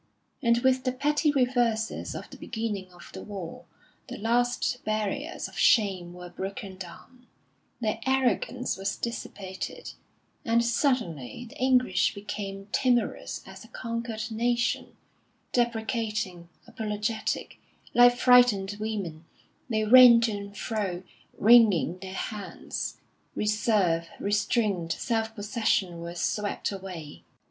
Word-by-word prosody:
And 235 Hz, -2 st, +4 dB
with 260 Hz, 0 st, +3 dB
the 255 Hz, -, +1 dB
petty 295 Hz, +3 st, +2 dB
reverses 245 Hz, -5 st, 0 dB
of -, -, -6 dB
the -, -, -10 dB
beginning 210 Hz, -5 st, -4 dB
of 175 Hz, -1 st, -14 dB
the 190 Hz, -, -7 dB
war, 195 Hz, -6 st, -7 dB, 0.4 s
the -, -, -7 dB
last 245 Hz, +2 st, 0 dB
barriers 215 Hz, -2 st, -2 dB
of -, -, -14 dB
shame 190 Hz, -6 st, +3 dB
were 180 Hz, 0 st, -10 dB
broken 195 Hz, +1 st, -6 dB
down; 215 Hz, +7 st, -12 dB, 0.5 s
their 215 Hz, -3 st, -1 dB
arrogance 255 Hz, -3 st, +1 dB
was 195 Hz, 0 st, -2 dB
dissipated, 195 Hz, -5 st, -6 dB, 0.5 s
and 235 Hz, 0 st, +2 dB
suddenly 235 Hz, -, -1 dB
the 275 Hz, +6 st, -13 dB
English 250 Hz, -8 st, +3 dB
became 200 Hz, -1 st, -6 dB
timorous 245 Hz, -3 st, 0 dB
as 190 Hz, 0 st, -11 dB
a -, -, -14 dB
conquered 230 Hz, -1 st, -4 dB
nation, 240 Hz, +2 st, 0 dB, 0.6 s
deprecating, 220 Hz, -6 st, -1 dB, 0.2 s
apologetic; 215 Hz, 0 st, -3 dB, 0.3 s
like 245 Hz, 0 st, +7 dB
frightened 245 Hz, -6 st, +5 dB
women, 195 Hz, -7 st, -4 dB, 0.4 s
they 215 Hz, -2 st, +1 dB
ran 245 Hz, +1 st, +9 dB
to 230 Hz, -1 st, +1 dB
and 200 Hz, -1 st, -6 dB
fro, 195 Hz, -5 st, -3 dB, 0.3 s
wringing 210 Hz, -6 st, +5 dB
their 190 Hz, 0 st, -7 dB
hands. 210 Hz, -1 st, -5 dB, 0.4 s
Reserve, 205 Hz, -6 st, +1 dB
restraint, 205 Hz, -4 st, 0 dB
self 225 Hz, -2 st, -2 dB
possession, 205 Hz, -4 st, 0 dB
were 170 Hz, +1 st, -6 dB
swept 205 Hz, +4 st, -1 dB
away 185 Hz, -6 st, -8 dB
215 Hz, 115 wpm, -27 LUFS, 195-240 Hz, 0.6 s, ran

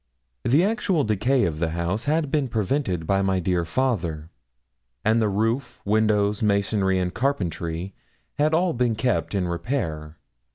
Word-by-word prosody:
The 140 Hz, +8 st, +4 dB
actual 195 Hz, -6 st, +1 dB
decay 120 Hz, +5 st, +2 dB
of 80 Hz, -2 st, -2 dB
the 85 Hz, -1 st, 0 dB
house 90 Hz, +7 st, -2 dB
had 150 Hz, -1 st, 0 dB
been 145 Hz, -3 st, +1 dB
prevented 110 Hz, -, -1 dB
by 100 Hz, +3 st, +2 dB
my 95 Hz, -1 st, +1 dB
dear 90 Hz, -1 st, 0 dB
father; 85 Hz, -7 st, -1 dB, 0.7 s
and 110 Hz, +2 st, +3 dB
the 110 Hz, -, +2 dB
roof, 115 Hz, +6 st, -1 dB
windows, 105 Hz, -1 st, +2 dB
masonry, 100 Hz, -2 st, +1 dB
and 90 Hz, 0 st, -1 dB
carpentry 90 Hz, -8 st, -2 dB, 0.5 s
had 150 Hz, +1 st, +3 dB
all 170 Hz, +2 st, +2 dB
been 120 Hz, -2 st, +1 dB
kept 115 Hz, -1 st, 0 dB
in 95 Hz, -2 st, 0 dB
repair. 85 Hz, -, -3 dB
105 Hz, 150 wpm, -24 LUFS, 90-130 Hz, 0.7 s, The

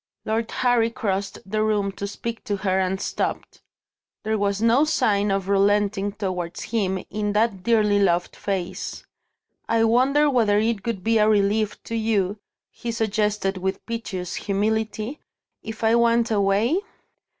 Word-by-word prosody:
Lord 225 Hz, +1 st, -1 dB
Harry 245 Hz, -2 st, +2 dB
crossed 200 Hz, -4 st, -2 dB
the 215 Hz, +2 st, -1 dB
room 210 Hz, -2 st, +1 dB
to 200 Hz, +1 st, -5 dB
speak 230 Hz, +3 st, -6 dB
to 205 Hz, -, -1 dB
her 190 Hz, -1 st, 0 dB
and 190 Hz, 0 st, 0 dB
stopped. -, -, -3 dB, 0.6 s
There 220 Hz, 0 st, 0 dB
was 200 Hz, -1 st, 0 dB
no 230 Hz, +5 st, +4 dB
sign 210 Hz, -10 st, +1 dB
of 195 Hz, -1 st, -1 dB
relenting 200 Hz, 0 st, +2 dB
towards 180 Hz, -4 st, -4 dB
him 190 Hz, -5 st, -1 dB
in 205 Hz, 0 st, -1 dB
that 210 Hz, -3 st, +1 dB
dearly 210 Hz, -1 st, +3 dB
loved 175 Hz, -3 st, +1 dB
face. 190 Hz, -3 st, -4 dB, 0.6 s
"I 230 Hz, 0 st, +3 dB
wonder 260 Hz, +6 st, +3 dB
whether 225 Hz, -7 st, +3 dB
it 220 Hz, -1 st, 0 dB
would 205 Hz, -6 st, -2 dB
be 225 Hz, 0 st, +3 dB
a 210 Hz, 0 st, +4 dB
relief 210 Hz, 0 st, +1 dB
to -, -, -7 dB
you," 210 Hz, -3 st, 0 dB, 0.3 s
he 235 Hz, -, -5 dB
suggested 210 Hz, -3 st, 0 dB
with 190 Hz, +1 st, -3 dB
piteous 195 Hz, -6 st, -4 dB
humility, 215 Hz, +5 st, -1 dB, 0.4 s
"if 220 Hz, +1 st, -8 dB
I 220 Hz, 0 st, +4 dB
went 235 Hz, 0 st, +3 dB
away?" 205 Hz, -, +2 dB
210 Hz, 150 wpm, -23 LUFS, 195-225 Hz, 0.6 s, no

